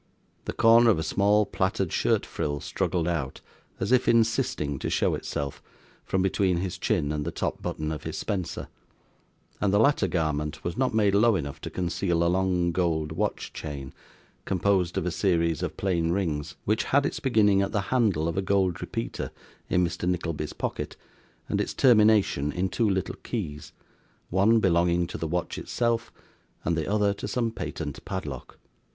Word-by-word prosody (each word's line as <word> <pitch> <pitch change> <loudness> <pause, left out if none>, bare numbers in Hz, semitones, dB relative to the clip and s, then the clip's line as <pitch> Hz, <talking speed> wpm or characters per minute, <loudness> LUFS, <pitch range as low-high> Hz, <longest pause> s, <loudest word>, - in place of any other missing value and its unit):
The - - -3
corner 115 +1 +6
of 105 - +4
a 80 - -1
small 105 +4 +3
plaited 95 -2 -1
shirt - - +2
frill 75 -1 -3
struggled 85 +2 -1
out, 75 -7 -2 0.4
as 100 - -1
if 130 0 +4
insisting 115 - +1
to - - -2
show - - +1
itself, 70 -1 -4 0.4
from 95 -1 0
between 95 -1 +2
his 90 0 -3
chin 75 - 0
and 75 -1 -2
the 80 - -2
top - - -3
button 75 0 -3
of 75 - -4
his - - -5
spencer; 95 -4 -3 0.9
and 100 - +2
the 100 - +4
latter 115 -2 +3
garment 75 -3 -2
was 85 - -3
not 130 -3 0
made 105 -3 +3
low 110 +2 +5
enough 70 -5 -4
to - - -5
conceal 85 -1 0
a 85 +1 +2
long 90 -2 +1
gold 80 -3 0
watch 80 - -2
chain, 70 -3 -6 0.5
composed 95 -2 +1
of - - 0
a 90 - 0
series 85 -3 +1
of - - -3
plain 85 -4 0
rings, 85 -5 -1
which 110 +2 +1
had 140 +1 +3
its - - -2
beginning 105 -6 +3
at 100 - -1
the 100 - 0
handle 100 -11 +2
of 85 - -2
a 95 - +1
gold 95 -2 +1
repeater - - -4 0.4
in 90 0 +3
Mr. 85 +1 -2
Nickleby's 85 -4 -2
pocket, - - -4 0.5
and - - 0
its - - -3
termination 105 - +4
in 90 +5 -1
two 110 +1 +1
little 95 -1 -1
keys: 80 -9 -5 0.6
one 100 +5 +4
belonging 85 -2 +2
to 85 - -7
the 80 - -2
watch 85 +2 -2
itself, 115 -1 -1 0.5
and 85 - +1
the 80 +3 -2
other 105 -1 +2
to 100 - -6
some 115 -3 -1
patent 80 -9 -5
padlock. - - -6
90 Hz, 175 wpm, -27 LUFS, 80-105 Hz, 0.9 s, corner